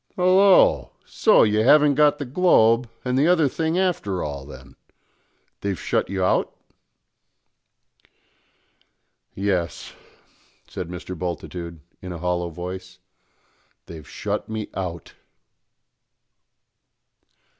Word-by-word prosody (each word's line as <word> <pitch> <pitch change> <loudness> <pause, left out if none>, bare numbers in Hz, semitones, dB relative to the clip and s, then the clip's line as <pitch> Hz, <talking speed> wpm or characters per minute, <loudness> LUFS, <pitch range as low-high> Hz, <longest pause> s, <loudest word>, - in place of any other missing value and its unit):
"Hallo! 185 +1 +4
so - - +4
you 105 0 +2
haven't 145 +5 +5
got 150 +1 +3
the 145 - -5
Globe 120 -6 +3 0.2
and 125 +1 0
the 150 - +3
other 170 -4 +4
thing 160 +5 -2
after 165 - -1
all, 70 -2 -6
then; 65 -1 -13 0.8
they've 100 -3 -3
shut - - -1
you 95 -1 -2
out?" - - +1 2.8
"Yes," 95 -4 -2 0.7
said 90 - -6
Mr. 90 +1 -7
Bultitude 85 -1 -6 0.2
in 90 - -7
a 85 - -6
hollow 90 0 -2
voice; 90 +2 -8 0.9
"they've 80 -4 -11
shut - - -4
me 110 -1 -5
out!" 85 -3 -6
95 Hz, 100 wpm, -23 LUFS, 90-145 Hz, 2.8 s, haven't